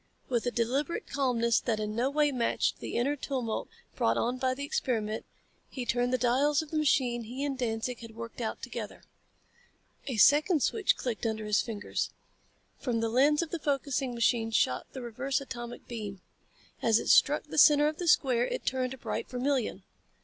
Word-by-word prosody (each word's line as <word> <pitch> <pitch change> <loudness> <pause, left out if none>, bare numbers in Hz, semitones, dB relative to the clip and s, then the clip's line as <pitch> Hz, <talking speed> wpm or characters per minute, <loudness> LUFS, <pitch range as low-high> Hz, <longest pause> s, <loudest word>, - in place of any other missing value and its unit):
With 245 -1 0
a - - +1
deliberate 260 +8 -1
calmness 235 -4 +1
that 225 -3 -1
in 210 0 -3
no 245 +4 +1
way 295 0 +2
matched 240 -3 0
the - - -6
inner 275 +5 +1
tumult 255 -5 -3 0.3
brought - - +1
on 245 +2 -1
by 255 0 +1
the 280 - -5
experiment, 220 -6 -2 0.4
he 255 -3 -5
turned 245 +1 +1
the 255 - +2
dials 275 +5 +2
of 310 - -14
the 315 - -1
machine 250 -5 +1
he 255 +5 -5
and 285 -1 -1
Danzig 240 -1 -2
had 230 -1 -11
worked 230 +1 -7
out 220 - -4
together. 235 -4 -6 1.0
A 255 -5 -2
second 295 - +5
switch 425 -4 +2
clicked 235 -2 -2
under 220 -1 -3
his 210 0 +2
fingers. 210 -3 -3 0.7
From 240 -4 -1
the 225 0 0
lense 285 +7 +3
of 325 - -8
the 340 - -3
focusing 275 -3 -1
machine 230 -1 +2
shot 130 - +1
the 260 - -6
reverse 255 +3 -2
atomic 240 -3 -8
beam. 210 -5 -6 0.6
As 225 -1 +4
it - - -2
struck 295 +1 +5
the 305 0 -2
center 295 0 +7
of 305 0 -2
the 350 - -4
square 250 -6 +3
it - - -4
turned 255 0 -1
a - - -18
bright - - -4
vermilion. 255 0 -1
250 Hz, 185 wpm, -29 LUFS, 230-280 Hz, 1.0 s, center